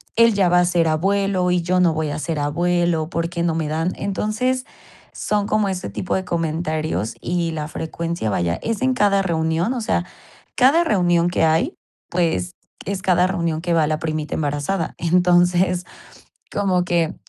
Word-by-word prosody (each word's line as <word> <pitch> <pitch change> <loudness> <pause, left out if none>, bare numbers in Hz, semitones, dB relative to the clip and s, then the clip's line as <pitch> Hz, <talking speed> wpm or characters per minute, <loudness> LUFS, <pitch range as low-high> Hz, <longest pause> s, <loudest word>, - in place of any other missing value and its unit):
él 230 -1 +5
ya 195 -2 +3
va 175 0 +4
a 175 - +3
ser 175 -2 +2
abuelo 190 +2 +1
y 180 -1 +1
yo 180 +2 +1
no 175 -3 +4
voy 155 -1 -1
a 145 - -4
ser 160 0 -3
abuelo, 170 +2 0
¿por 165 0 -2
qué 170 -1 -4
no 165 -2 0
me 160 -2 -1
dan?". 160 +4 -1
Entonces, 250 +6 -1 0.5
son 205 -1 -1
como 215 -2 +1
ese 185 - -4
tipo 180 - -4
de 190 - -2
comentarios 155 - -2
y 175 -1 -1
la 155 -1 -4
frecuencia, 165 -4 -3
vaya, 85 -3 0
es 230 +1 -2
en 260 0 +2
cada 200 -3 +3
reunión, 165 +3 0
o 255 - -3
sea, 180 -4 0 0.5
cada 280 +7 +5
reunión 175 - +2
que 175 - 0
hay, 160 +1 +1 0.3
pues, 175 0 -1 0.3
es 195 -1 -3
cada 180 -1 +3
reunión 170 -4 -1
que 175 -1 -1
va 160 -2 +3
la 155 - 0
primita 155 -1 -3
embarazada. 150 +4 -2
Entonces, 180 +1 +3 0.7
como 185 -3 +1
que 170 -2 0
175 Hz, 175 wpm, -21 LUFS, 160-190 Hz, 0.7 s, él